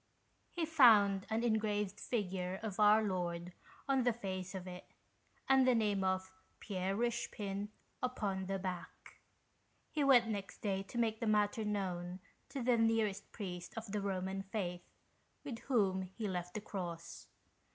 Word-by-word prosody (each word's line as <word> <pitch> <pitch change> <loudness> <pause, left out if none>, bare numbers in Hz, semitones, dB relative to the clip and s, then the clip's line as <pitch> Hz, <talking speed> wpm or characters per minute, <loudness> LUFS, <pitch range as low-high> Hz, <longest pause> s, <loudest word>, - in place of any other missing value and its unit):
He 340 -2 -2
found 215 -11 +6
an 220 +1 0
engraved 210 -3 0
figure 190 -4 -2
of 215 -2 -4
Our 210 +1 +6
Lord 175 -3 -2 0.3
on 270 -1 +3
the 245 0 +3
face 195 -4 -5
of 185 -1 -5
it, 180 0 -8 0.6
and 265 -1 +5
the 255 - +5
name 205 -3 +2
of 190 0 0 0.3
Pierre 195 -1 -2
Eichepin 210 -4 -2 0.3
upon 205 -7 -1
the 195 0 -1
back. 180 -2 -6 0.7
He 300 - +1
went 250 -4 +6
next 200 -3 -5
day 195 -2 0
to 195 +5 -8
make 220 -2 +1
the 230 - -1
matter 210 +1 +2
known 185 -3 -2 0.3
to 270 -2 -4
the 245 -1 +4
nearest 225 -3 +1
Priest 180 -2 -6
of 225 -2 -5
the 210 0 -1
Roman 190 0 -2
Faith, 190 -3 -4 0.5
with 255 -6 -5
whom 195 -7 +3
he 190 +4 -5
left 180 -2 -4
the 215 - -2
cross. 170 -5 -6
200 Hz, 150 wpm, -36 LUFS, 185-225 Hz, 0.7 s, found